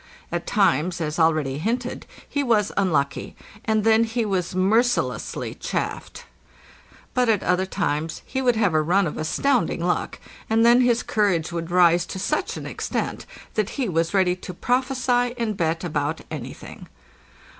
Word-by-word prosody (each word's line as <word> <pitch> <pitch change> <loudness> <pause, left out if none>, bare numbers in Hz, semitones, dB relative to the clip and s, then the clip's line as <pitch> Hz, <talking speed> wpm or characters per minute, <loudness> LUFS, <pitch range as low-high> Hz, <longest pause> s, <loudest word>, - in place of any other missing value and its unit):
At - - -3
times, 185 -5 +2
as 155 0 -3
already 155 -4 +2
hinted, 240 +7 -3 0.2
he 285 - -1
was 225 -6 +2
unlucky, 150 -8 0 0.3
and 220 -1 +1
then 225 +1 +5
he 230 0 -1
was 185 -3 -1
mercilessly 220 +7 +1
chaffed; - - -4 0.9
but 250 -2 +2
at 210 -3 +2
other 185 +1 +1
times 160 -5 -2
he 265 - -3
would 245 -2 +3
have 205 -6 +2
a 155 - +3
run 180 +5 +2
of 150 - -4
astounding 235 - 0
luck, 180 - -1 0.3
and 225 +1 +3
then 240 +1 +6
his 245 -1 +2
courage 190 -7 +1
would 170 0 -4
rise 175 -1 +4
to - - -6
such 190 - -1
an - - -7
extent - - -3 0.3
that 215 -1 0
he 265 -4 0
was 165 -2 0
ready 185 -2 +2
to 180 -1 -8
prophesy 250 +1 0
and 225 -3 -1
bet 165 -2 -1
about 150 -4 -2
anything. - - -8
195 Hz, 155 wpm, -23 LUFS, 170-235 Hz, 0.9 s, then